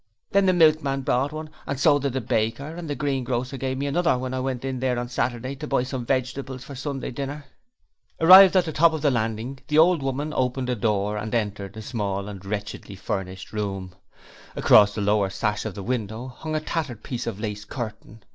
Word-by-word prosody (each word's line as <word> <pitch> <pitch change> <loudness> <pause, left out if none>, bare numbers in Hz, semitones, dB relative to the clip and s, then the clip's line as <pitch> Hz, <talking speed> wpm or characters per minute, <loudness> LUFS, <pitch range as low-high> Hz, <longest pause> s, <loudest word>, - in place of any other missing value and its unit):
'Then 200 -1 +4
the - - +6
milkman 155 -5 +3
brought 135 +1 +1
one, 155 0 -6 0.2
and 140 - -3
so 145 0 +5
did 140 -2 -2
the 130 - -1
baker, 115 +8 -1
and 170 -2 -7
the 145 - -1
greengrocer 130 -3 -2
give 130 0 -3
me 140 - -2
another 165 0 +2
when 130 0 -4
I 130 - -1
went 130 -1 -3
in 130 -1 -3
there 125 -1 0
on 120 0 -3
Saturday 125 +1 -2
to 150 +2 -6
buy 135 -3 +1
some 125 -2 -5
vegetables 130 0 -2
for 140 - -9
Sunday 135 0 -4
dinner.' 140 +3 -5 0.7
Arrived 185 +3 +9
at 180 - +4
the 160 - -3
top 165 0 +5
landing 120 -1 -1
the 150 - +1
old 165 0 +5
woman 140 +3 -2
opened 125 0 0
a - - 0
door 105 -1 0
and 110 +2 -3
entered 105 -2 -3
a 110 - -6
small 100 -4 -3
and 100 -2 -9
wretchedly 100 0 -5
furnished 95 -1 -5
room. 95 -3 -3 0.6
Across 105 -1 +6
the 105 - -2
lower 100 -1 +2
sash 105 +2 -2
of 110 - -4
the 100 - -6
window 115 +1 -3
hung 155 +5 -5
a - - +2
tattered 150 -8 -3
piece 125 -2 -4
of 110 -3 -4
lace 105 -1 -4
curtain. 110 -1 -7
125 Hz, 205 wpm, -24 LUFS, 110-140 Hz, 0.7 s, Arrived